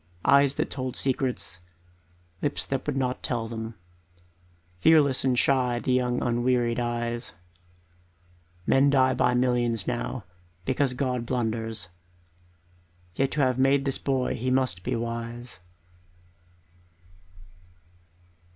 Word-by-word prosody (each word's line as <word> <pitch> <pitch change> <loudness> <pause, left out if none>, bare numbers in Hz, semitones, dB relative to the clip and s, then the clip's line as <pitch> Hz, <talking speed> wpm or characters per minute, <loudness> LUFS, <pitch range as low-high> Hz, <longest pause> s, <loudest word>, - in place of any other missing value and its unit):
Eyes 140 0 +5
that - - -2
told 130 -2 -4
secrets, 130 -9 -1 0.8
lips 145 - -1
that 135 +1 -3
would 145 -2 -1
not 130 -1 -1
tell 115 -2 -2
them, 115 0 -6 1.0
Fearless 145 - +4
and 130 -2 +2
shy 125 -2 +2
the 125 +1 0
young 125 -1 +1
unwearied 120 0 +1
eyes 120 0 -2 1.3
Men 135 +1 +4
die 130 -2 +4
by 125 0 +2
millions 120 -3 +1
now, 120 -1 -3 0.4
because 130 0 0
God 125 -3 -2
blunders, 115 -5 -2 1.3
Yet 135 +7 +1
to 150 - +1
have 130 -1 +2
made 135 +1 +3
this 135 -1 +1
boy 130 -2 0
he 125 +3 -2
must 130 -9 +2
be - - -2
wise. 115 -1 -5
125 Hz, 115 wpm, -26 LUFS, 120-130 Hz, 1.3 s, Eyes